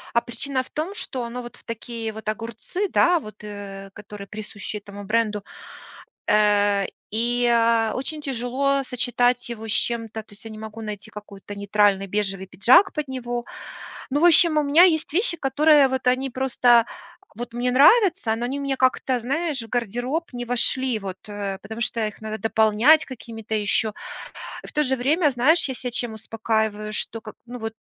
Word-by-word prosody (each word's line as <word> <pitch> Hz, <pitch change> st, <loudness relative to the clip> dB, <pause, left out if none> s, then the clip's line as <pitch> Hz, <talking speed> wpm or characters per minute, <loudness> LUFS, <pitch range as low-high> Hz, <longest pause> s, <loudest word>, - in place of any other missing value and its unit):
а 235 Hz, -, +5 dB
причина 260 Hz, +3 st, -3 dB
в -, -, -20 dB
том, 330 Hz, +7 st, -3 dB
что 260 Hz, -, -4 dB
оно 240 Hz, +1 st, -6 dB
вот 240 Hz, -, -10 dB
в -, -, -17 dB
такие 230 Hz, 0 st, -5 dB
вот 220 Hz, 0 st, -10 dB
огурцы, 230 Hz, -, -3 dB
да, 350 Hz, 0 st, +4 dB
вот, 215 Hz, -5 st, -12 dB
э, 195 Hz, -1 st, -8 dB
которые 205 Hz, -1 st, -10 dB
присущи 210 Hz, 0 st, -6 dB
этому 205 Hz, 0 st, -10 dB
бренду. 215 Hz, -1 st, 0 dB, 0.8 s
Э, 205 Hz, -1 st, +3 dB, 0.2 s
и, 240 Hz, +3 st, 0 dB
а, 230 Hz, -1 st, +3 dB
очень 300 Hz, +4 st, -3 dB
тяжело 275 Hz, +1 st, 0 dB
сочетать 245 Hz, -1 st, 0 dB
его 225 Hz, -1 st, -6 dB
с -, -, -3 dB
чем-то, 225 Hz, -1 st, -1 dB
то 210 Hz, -, -17 dB
есть 205 Hz, -, -17 dB
я 225 Hz, -, -7 dB
не 215 Hz, -, -9 dB
могу 220 Hz, +1 st, -8 dB
найти 210 Hz, 0 st, -7 dB
какой-то 205 Hz, -1 st, -10 dB
нейтральный 200 Hz, -1 st, +2 dB
бежевый 195 Hz, -1 st, -2 dB
пиджак 255 Hz, -, +5 dB
под 300 Hz, -3 st, -3 dB
него. 240 Hz, -2 st, -4 dB, 0.7 s
Ну, 290 Hz, +3 st, +1 dB
в -, -, +5 dB
общем, 335 Hz, -2 st, +6 dB
у 300 Hz, -, +3 dB
меня 290 Hz, +5 st, +6 dB
есть 315 Hz, -4 st, +1 dB
вещи, 365 Hz, -1 st, +1 dB
которые 290 Hz, +1 st, +4 dB
вот 260 Hz, -1 st, -2 dB
они 260 Hz, +2 st, +2 dB
просто 245 Hz, -2 st, +3 dB, 0.5 s
вот 235 Hz, +1 st, -7 dB
мне 245 Hz, +1 st, 0 dB
нравятся, 285 Hz, -, +5 dB
но 235 Hz, +2 st, -3 dB
они 270 Hz, +3 st, -3 dB
мне 275 Hz, -1 st, -1 dB
как-то, 255 Hz, 0 st, +1 dB
знаешь, 280 Hz, +3 st, -2 dB
в 225 Hz, -, -10 dB
гардероб 245 Hz, -, -2 dB
не 245 Hz, 0 st, -4 dB
вошли 245 Hz, 0 st, 0 dB
вот, 190 Hz, -2 st, -6 dB
э, 200 Hz, -2 st, -4 dB
потому 220 Hz, +3 st, -8 dB
что 230 Hz, -2 st, 0 dB
их 215 Hz, -, -10 dB
надо 220 Hz, 0 st, -5 dB
дополнять 220 Hz, +8 st, +4 dB
какими-то 225 Hz, -4 st, -8 dB
еще 210 Hz, +1 st, 0 dB, 0.7 s
И -, -, -10 dB
в -, -, -9 dB
то 300 Hz, -, +2 dB
же 265 Hz, -1 st, 0 dB
время, 295 Hz, +6 st, +2 dB
знаешь, 285 Hz, +7 st, +3 dB
я -, -, -2 dB
ся 245 Hz, 0 st, -5 dB
чем 240 Hz, -1 st, -1 dB
успокаиваю, 220 Hz, -1 st, -2 dB
что 225 Hz, -, -1 dB
к 215 Hz, -1 st, -10 dB
ну 245 Hz, +1 st, -8 dB
вот, 225 Hz, -1 st, -4 dB
235 Hz, 185 wpm, -23 LUFS, 215-265 Hz, 0.8 s, общем